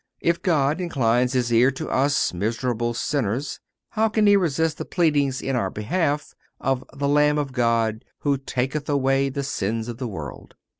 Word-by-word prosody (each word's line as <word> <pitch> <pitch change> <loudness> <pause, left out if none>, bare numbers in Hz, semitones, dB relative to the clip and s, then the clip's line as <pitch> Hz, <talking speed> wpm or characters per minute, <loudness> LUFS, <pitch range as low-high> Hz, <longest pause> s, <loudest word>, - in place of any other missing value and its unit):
If 170 0 +1
God 155 -1 +1
inclines 125 -6 +1
His 120 -2 +1
ear 120 +3 +5
to - - -5
us 140 -3 +1
miserable 120 +4 -1
sinners, 130 0 -2 0.3
how 220 0 +1
can 215 0 +2
He 205 0 +6
resist 160 -4 +1
the - - -2
pleadings 145 -6 +1
in 135 - -1
our 95 -6 0
behalf 150 - -1 0.3
of 135 -1 0
the 140 0 -2
"Lamb 150 +1 +3
of 145 -2 -2
God 115 -3 +1 0.2
who 140 -2 +1
taketh 135 +3 -3
away 135 -1 +2
the 140 +1 -3
sins 115 -4 -2
of 120 0 -6
the 130 - -3
world." 80 - -8
135 Hz, 170 wpm, -23 LUFS, 120-150 Hz, 0.3 s, He